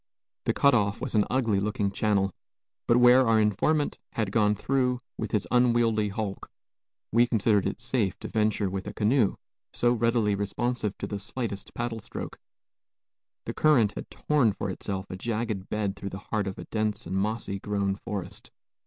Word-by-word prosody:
The - - +2
cut 140 0 +4
off 100 -4 +1
was 130 - -4
an 105 -2 +3
ugly 115 -6 +1
looking 100 -1 -1
channel; 100 -1 +1 0.6
but 120 - +5
where 125 +1 +6
our 115 -1 +4
informant 110 +9 +1
had 110 -4 -1
gone 105 -1 +3
through, 125 +2 0 0.2
with - - -4
his 105 -3 0
unwieldy 120 -3 +3
hulk, 100 -1 -4 0.6
we 120 +2 +4
considered 105 -3 +2
it - - -4
safe 115 -5 0
to - - -5
venture 105 -2 +1
with 95 +1 -4
a 105 - -6
canoe, 110 0 +2 0.4
so 120 0 +2
readily 115 -3 +2
responsive 105 +2 -2
to - - -4
the 100 - -4
slightest 110 -1 -5
paddle 120 -1 -3
stroke. - - -7 1.1
The - - -4
current 130 -10 +4
had - - -7
torn 140 -8 +2
for 95 - -3
itself 95 +1 -4
a - - -4
jagged 110 -1 -3
bed 105 -2 -1
through 100 0 -6
the 95 - -6
heart 105 -2 0
of 95 - -5
a - - -6
dense 110 0 -1
and - - -4
moss 105 +4 -1
grown 100 -1 -1
forest. 100 -3 -6
110 Hz, 175 wpm, -27 LUFS, 100-120 Hz, 1.1 s, where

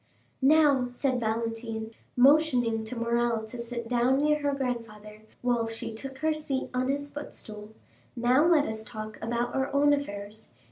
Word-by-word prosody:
"Now," 280 -2 +5
said 250 +1 -1
Valentine, 225 0 -3 0.3
motioning 250 -5 +4
to 250 - -6
Morrel 235 -1 0
to 235 +2 -9
sit 235 0 -5
down 245 +2 +2
near 300 +1 +2
her 285 0 +1
grandfather, 220 -5 -5 0.2
while 240 -2 +1
she 225 0 -5
took 265 +4 -7
her 315 +3 +1
seat 295 -3 -3
on 255 0 0
his 285 +1 -1
footstool,—"now 240 +2 -2
let 315 -4 +5
us 220 0 -4
talk 215 -1 -8
about 235 +1 -1
our 270 +1 -1
own 290 +1 +4
affairs. 210 -6 -5
245 Hz, 150 wpm, -28 LUFS, 225-275 Hz, 0.3 s, Now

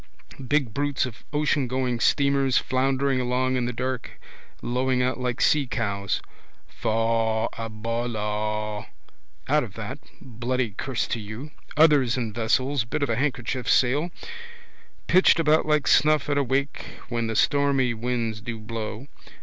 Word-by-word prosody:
Big 140 -6 +1
brutes 145 0 0
of 115 -5 -9
oceangoing 130 -5 0
steamers 140 -2 +3
floundering 135 0 +1
along 130 +1 0
in 125 -1 0
the 125 - -1
dark, 125 +1 -4 0.4
lowing 125 +1 +1
out 130 +1 -1
like 125 -1 -2
seacows. 105 -9 +1 0.5
Faugh 115 0 0
a 115 0 -5
ballagh! 105 -2 -3 0.6
Out - - +3
of - - -9
that, - - -6 0.2
bloody 125 -1 -2
curse 130 +5 -2
to 115 - -3
you! 110 +8 -8 0.3
Others 145 -6 +5
in 115 -4 -2
vessels, 125 +4 +1
bit 120 +5 -2
of 135 - 0
a - - +1
handkerchief 130 -1 -2
sail, 140 +7 +3 1.0
pitched 185 -2 +5
about 155 -1 +3
like 150 -1 +2
snuff 150 0 +4
at 140 - +1
a - - +2
wake 140 +2 -1 0.3
when 115 -1 -1
the 110 - -3
stormy 140 -1 +2
winds 115 -2 -2
do 120 0 -5
blow. 110 +2 -5
125 Hz, 140 wpm, -25 LUFS, 115-135 Hz, 1.0 s, Others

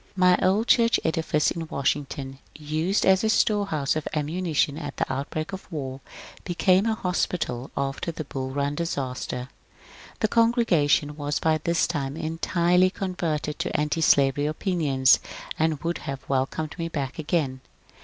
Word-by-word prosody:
My 180 -1 +5
old 195 +5 +3
church 230 -1 +4
edifice 160 -2 +1
in 165 -1 -4
Washington, 140 -1 -2 0.2
used 155 +6 0
as 190 +1 +4
a 220 - +2
storehouse 200 -11 +1
of 155 - -3
ammunition 155 -1 0
at 145 -3 -6
the - - -1
outbreak 155 +6 -4
of 190 0 -8
war, 135 -4 -5 0.4
became 185 +3 +2
a 220 - +1
hospital 175 - -2
after 140 +4 -2
the 160 -1 -5
Bull 135 -2 -5
Run 140 +1 -1
disaster. 130 -5 -3 0.7
The 215 - +3
congregation 205 - +2
was 145 -1 -1
by 160 -1 +1
this 170 +2 +1
time 140 -3 -3
entirely 170 +3 +2
converted 170 -6 -3
to - - -1
^tislavery 145 -2 +2
opinions, 150 -7 +3 0.4
and 160 -2 +1
would 170 +1 -1
have 135 -2 -6
welcomed 140 +5 -2
me 165 - -1
back 140 -2 -4
again. 145 -5 -1
155 Hz, 145 wpm, -25 LUFS, 140-180 Hz, 0.7 s, My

